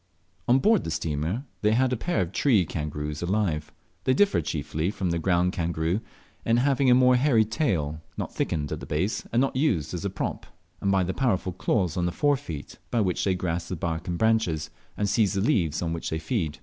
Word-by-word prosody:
On 125 Hz, -, +5 dB
board 210 Hz, +9 st, +3 dB
the -, -, -4 dB
steamer 80 Hz, -, -2 dB, 0.2 s
they 105 Hz, 0 st, +3 dB
had 130 Hz, +2 st, +2 dB
a -, -, +2 dB
pair 125 Hz, -, -1 dB
of 90 Hz, -1 st, -2 dB
tree 110 Hz, -6 st, +3 dB
kangaroos 75 Hz, -1 st, -4 dB
alive. 85 Hz, -5 st, -1 dB, 0.3 s
They 130 Hz, -, +3 dB
differ 205 Hz, +6 st, +3 dB
chiefly 80 Hz, +2 st, -2 dB
from 95 Hz, -4 st, -2 dB
the 85 Hz, -, 0 dB
ground 90 Hz, +1 st, +2 dB
kangaroo 85 Hz, +2 st, -1 dB, 0.4 s
in 115 Hz, +1 st, +2 dB
having 135 Hz, +1 st, +3 dB
a 125 Hz, -, +7 dB
more 125 Hz, 0 st, +5 dB
hairy 125 Hz, -5 st, +4 dB
tail, 85 Hz, -, -1 dB, 0.2 s
not -, -, -4 dB
thickened 75 Hz, -4 st, -2 dB
at -, -, -3 dB
the -, -, -9 dB
base, 90 Hz, +8 st, -1 dB
and 115 Hz, -, +2 dB
not 135 Hz, 0 st, +1 dB
used 120 Hz, -, +1 dB
as -, -, -4 dB
a -, -, -1 dB
prop; -, -, -4 dB, 0.3 s
and 100 Hz, -, +1 dB
by 95 Hz, -1 st, +3 dB
the 90 Hz, +1 st, -2 dB
powerful 95 Hz, -8 st, 0 dB
claws 90 Hz, -2 st, 0 dB
on 90 Hz, -1 st, +1 dB
the -, -, -1 dB
fore 145 Hz, +9 st, +2 dB
feet, 80 Hz, -, -8 dB
by 120 Hz, -, 0 dB
which 95 Hz, -4 st, 0 dB
they 95 Hz, -2 st, +2 dB
grasp 85 Hz, -1 st, -3 dB
the 95 Hz, -, -2 dB
bark 85 Hz, +1 st, -3 dB
and 85 Hz, -1 st, -2 dB
branches, 110 Hz, -9 st, +1 dB, 0.3 s
and 105 Hz, -, 0 dB
seize 100 Hz, 0 st, +2 dB
the 100 Hz, -, 0 dB
leaves 90 Hz, -, +1 dB
on 85 Hz, -1 st, -1 dB
which 85 Hz, -, -4 dB
they 80 Hz, -, -2 dB
feed. 80 Hz, -, -2 dB
95 Hz, 220 wpm, -26 LUFS, 80-120 Hz, 0.4 s, a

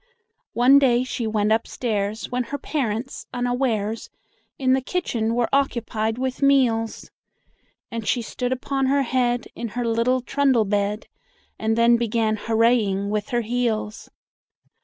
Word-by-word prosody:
One 255 Hz, +4 st, +6 dB
day 250 Hz, -3 st, +3 dB
she 245 Hz, -2 st, -3 dB
went 215 Hz, -1 st, +1 dB
upstairs, 220 Hz, -2 st, -1 dB
When 250 Hz, 0 st, -1 dB
her 285 Hz, +5 st, -4 dB
parents, 260 Hz, -4 st, -3 dB
unawares, 245 Hz, -3 st, -1 dB, 0.5 s
In 260 Hz, -1 st, +2 dB
the 265 Hz, -, +2 dB
kitchen 235 Hz, -8 st, -1 dB
were 240 Hz, -1 st, +1 dB
occupied 230 Hz, -5 st, 0 dB
with 260 Hz, +1 st, -3 dB
meals, 250 Hz, -5 st, +2 dB, 0.8 s
And 230 Hz, -2 st, -5 dB
she 240 Hz, -, +1 dB
stood 250 Hz, +2 st, -3 dB
upon 265 Hz, +1 st, -1 dB
her 280 Hz, +1 st, +2 dB
head 245 Hz, -2 st, 0 dB
In 235 Hz, -, -5 dB
her 245 Hz, -, 0 dB
little 230 Hz, +3 st, +1 dB
trundle 260 Hz, -3 st, +2 dB
bed, 205 Hz, +1 st, -1 dB, 0.5 s
And 220 Hz, +1 st, 0 dB
then 235 Hz, 0 st, +5 dB
began 225 Hz, -2 st, 0 dB
hooraying 220 Hz, -3 st, +1 dB
with 210 Hz, -1 st, -2 dB
her 240 Hz, -1 st, 0 dB
heels. 230 Hz, -2 st, -2 dB
235 Hz, 135 wpm, -23 LUFS, 220-255 Hz, 0.8 s, One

